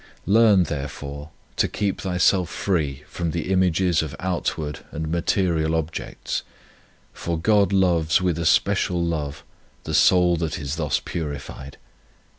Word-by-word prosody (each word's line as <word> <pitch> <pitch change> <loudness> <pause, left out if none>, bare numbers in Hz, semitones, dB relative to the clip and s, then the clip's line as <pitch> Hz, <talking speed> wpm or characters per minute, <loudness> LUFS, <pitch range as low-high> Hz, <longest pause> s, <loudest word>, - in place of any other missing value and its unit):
Learn, 105 -3 +5
therefore, 70 -1 -6 0.3
to - - +3
keep 100 -2 -2
thyself 90 -1 +2
free 75 -7 -1
from 85 -2 -3
the 85 +3 -3
images 90 -2 +2
of 75 -4 -5
outward 80 -5 -2
and 80 +1 -4
material 85 -2 +1
objects, 80 0 -3 0.7
for 85 -1 -3
God 100 +3 +3
loves 85 -5 +3
with 90 -3 0
a 85 - -2
special 90 -2 +2
love 75 -4 -3 0.4
the - - -5
soul 90 -2 +5
that 80 -2 -2
is 70 +1 -4
thus 75 -6 0
purified. 70 -3 -6
85 Hz, 130 wpm, -23 LUFS, 75-95 Hz, 0.7 s, Learn